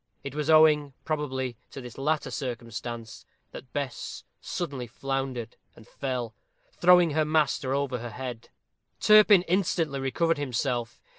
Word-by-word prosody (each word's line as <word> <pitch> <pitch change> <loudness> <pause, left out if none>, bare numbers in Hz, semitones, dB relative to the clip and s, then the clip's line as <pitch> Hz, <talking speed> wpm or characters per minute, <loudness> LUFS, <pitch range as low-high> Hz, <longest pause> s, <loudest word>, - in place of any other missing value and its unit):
It 140 -1 -6
was 150 +1 -3
owing, 150 -3 +5
probably, 130 -5 -2
to - - -9
this 125 -3 -9
latter 150 +3 -1
circumstance, 120 -2 -6 0.3
that 125 - -11
Bess 140 -3 -5 0.2
suddenly 140 -8 -4
floundered 130 -1 -4 0.2
and 110 - -16
fell, 125 -4 -4 0.4
throwing 180 -2 +5
her 155 +1 +2
master 150 -3 +1
over 140 -3 -1
her 120 +1 -6
head. 125 0 -7 0.5
Turpin 210 -3 +7
instantly 165 -6 0
recovered 155 +4 0
himself. 125 -3 -2
135 Hz, 130 wpm, -27 LUFS, 125-155 Hz, 0.5 s, Turpin